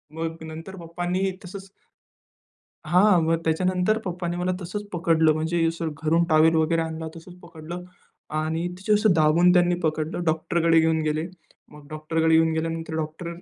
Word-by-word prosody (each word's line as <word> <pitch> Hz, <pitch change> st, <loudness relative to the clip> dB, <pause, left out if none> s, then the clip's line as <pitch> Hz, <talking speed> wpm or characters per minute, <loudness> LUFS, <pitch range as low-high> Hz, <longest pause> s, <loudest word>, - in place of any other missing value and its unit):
मग 165 Hz, 0 st, -4 dB
नंतर 160 Hz, +4 st, -8 dB
पप्पांनी 175 Hz, +3 st, -2 dB
तसंच 195 Hz, +1 st, -9 dB, 1.2 s
हां, 180 Hz, +3 st, +4 dB
मग 165 Hz, +1 st, +2 dB
त्याच्यानंतर 180 Hz, +5 st, +1 dB
पप्पांनी 175 Hz, -1 st, -3 dB
मला 180 Hz, +1 st, -1 dB
तसंच 185 Hz, +4 st, -5 dB
पकडलं. 165 Hz, -2 st, +3 dB
म्हणजे 165 Hz, +2 st, 0 dB
असं 165 Hz, 0 st, -3 dB
घरून 165 Hz, +2 st, +3 dB
टॉवेल 160 Hz, +1 st, +4 dB
वगैरे 160 Hz, +1 st, +2 dB
आणला, 160 Hz, 0 st, -5 dB
तसंच 165 Hz, +2 st, -12 dB
पकडलं 170 Hz, +1 st, -9 dB, 0.6 s
आणि 160 Hz, +2 st, -2 dB
तिथं 195 Hz, +3 st, 0 dB
असं 210 Hz, -2 st, +3 dB
दाबून 165 Hz, +3 st, +4 dB
त्यांनी 175 Hz, -1 st, +3 dB
पकडलं, 160 Hz, +1 st, -2 dB
डॉक्टरकडे 165 Hz, +1 st, +2 dB
घेऊन 160 Hz, 0 st, +2 dB
गेले. 155 Hz, +1 st, -1 dB, 0.5 s
मग 150 Hz, -1 st, -14 dB
डॉक्टरकडे 160 Hz, +1 st, 0 dB
घेऊन 160 Hz, 0 st, +4 dB
गेल्यानंतर 165 Hz, 0 st, -3 dB
डॉक्टर 160 Hz, +2 st, -4 dB
165 Hz, 150 wpm, -24 LUFS, 160-175 Hz, 1.2 s, हां